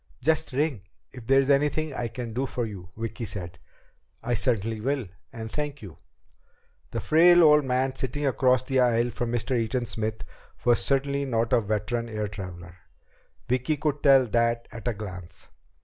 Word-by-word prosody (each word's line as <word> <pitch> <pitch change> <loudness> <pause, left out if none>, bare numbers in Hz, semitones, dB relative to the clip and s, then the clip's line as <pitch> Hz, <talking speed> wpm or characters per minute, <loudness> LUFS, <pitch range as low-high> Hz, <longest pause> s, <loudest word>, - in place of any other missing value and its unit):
"Just 160 +4 +1
ring 135 -4 0 0.3
if 125 -3 -11
there's 135 +1 +4
anything 150 +2 +1
I 120 -2 -2
can 115 0 -6
do 130 +4 -1
for 120 -2 -2
you," 95 -5 -8
Vicki 115 +1 -5
said. 90 -5 -5 0.6
"I 120 +1 -1
certainly 115 -2 0
will, 135 0 -1 0.3
and 110 -1 -7
thank 145 -3 -4
you." 95 -6 -11 0.9
The - - -3
frail 175 +2 +6
old 150 -1 +6
man 130 +1 0
sitting 135 +2 -3
across 130 -2 +3
the 135 -1 0
aisle 120 -1 +2
from 120 0 -3
Mr. 120 +2 -1
Eaton 120 +1 -1
Smith 110 -1 -3 0.4
was 120 -1 +4
certainly 140 0 +1
not 115 -3 0
a - - +5
veteran 110 +3 -2
air 105 -1 -3
traveler. 90 -3 -9 0.7
Vicki 130 +5 0
could 145 -1 -1
tell 135 -2 +6
that 115 +1 0
at 115 +1 -7
a 120 - +1
glance. 90 -5 -9
120 Hz, 165 wpm, -26 LUFS, 110-135 Hz, 0.9 s, frail